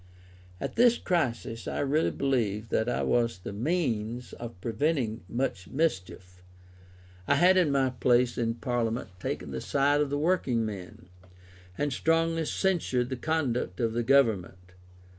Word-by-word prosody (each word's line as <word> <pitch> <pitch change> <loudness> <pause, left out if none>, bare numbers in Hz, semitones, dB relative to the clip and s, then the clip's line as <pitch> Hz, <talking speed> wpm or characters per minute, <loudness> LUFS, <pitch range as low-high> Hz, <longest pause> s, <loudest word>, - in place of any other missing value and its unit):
At - - -5
this 240 0 +5
crisis 120 - -2
I - - -3
really 145 +3 +2
believe 115 -6 -1
that 110 +2 +1
I - - -1
was 115 -4 +1
the 90 - -7
means 120 - -2
of 120 -5 -8
preventing 115 - -1
much 120 -7 -2
mischief. 90 - -3 0.9
I 140 - +4
had 180 +5 +5
in 175 -6 +3
my 135 -2 +2
place 125 0 +2
in 115 -1 -1
Parliament 115 -1 -2
taken 85 - -4
the 65 -1 -4
side 145 +1 +2
of 145 - 0
the 145 - -1
working 145 -8 +1
men, 95 -5 -7 0.7
and 145 -2 -1
strongly 165 +2 +1
censured 150 -10 0
the 130 - -2
conduct 125 - -1
of 115 -2 0
the 120 - 0
Government. 105 -8 +1
125 Hz, 145 wpm, -28 LUFS, 110-145 Hz, 0.9 s, this